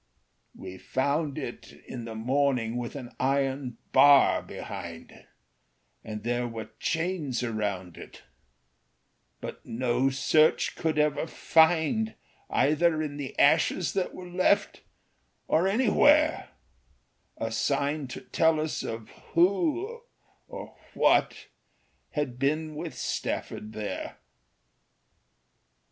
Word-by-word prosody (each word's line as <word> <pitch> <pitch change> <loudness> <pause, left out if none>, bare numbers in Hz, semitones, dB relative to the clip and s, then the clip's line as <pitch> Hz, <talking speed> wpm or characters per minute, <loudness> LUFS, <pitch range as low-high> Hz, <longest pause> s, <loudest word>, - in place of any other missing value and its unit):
"We 95 0 -9
found 140 +2 -1
it - - -7
in 120 -2 -7
the 115 -1 -7
morning 125 0 0
with 120 +2 -5
an 125 -4 -7
iron 135 -2 0
bar 145 -1 +6
behind, 85 -1 -9 0.8
And 105 -1 -7
there 120 +1 -1
were 115 -1 -7
chains 160 -7 -1
around 100 -7 -3
it; - - -12 1.2
but - - -7
no 125 +2 0
search 155 +4 +3
could 160 -1 -1
ever 150 +1 +1
find, 165 +8 +2 0.3
Either 155 +3 +2
in 145 -2 -5
the 140 -2 -6
ashes 165 +4 +3
that 190 -2 -2
were 180 - -8
left, 185 +3 +1 0.7
or 165 +4 +3
anywhere, 290 +8 +3 0.9
A - - -3
sign 145 0 0
to 125 - -7
tell 160 -1 +2
of 115 -8 -4 0.3
who 320 - +1 0.5
or - - -9 0.2
what - - +2 0.7
had 140 -5 -2
been 155 +3 0
with 150 - -6
Stafford 105 +1 -4
there. 105 -1 -5
145 Hz, 105 wpm, -28 LUFS, 120-165 Hz, 1.2 s, bar